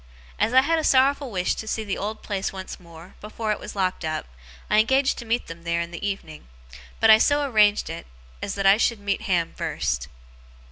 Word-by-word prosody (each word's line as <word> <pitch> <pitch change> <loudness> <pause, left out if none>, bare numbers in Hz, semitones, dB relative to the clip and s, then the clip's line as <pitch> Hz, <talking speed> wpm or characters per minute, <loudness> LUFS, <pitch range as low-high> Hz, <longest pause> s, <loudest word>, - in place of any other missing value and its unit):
As 225 - +2
I 260 +1 +6
had 325 +3 +1
a - - -2
sorrowful 275 0 +3
wish 185 -4 0
to 220 - -7
see 220 0 -2
the 200 -2 -3
old 215 +2 -5
place 195 -2 -2
once 190 -1 -8
more, 170 +1 -14
before 215 +1 -4
it 210 - -2
was - - -9
locked 185 -2 -1
up, 155 0 -3 0.4
I 210 - +3
engaged 265 +5 +2
to 240 - -8
meet 235 +2 0
them 165 0 -10
there 170 0 -1
in 170 0 -4
the 170 - -8
evening. 195 - -5 0.5
But 225 - +6
I 220 - +8
so 290 +4 +3
arranged 210 -4 +3
it, 165 +1 -7 0.3
as 200 - -3
that 195 -1 -2
I 195 +1 +7
should 235 -1 +1
meet 200 -1 -2
Ham 175 -3 0
first. 65 0 -2
205 Hz, 220 wpm, -24 LUFS, 175-225 Hz, 0.5 s, I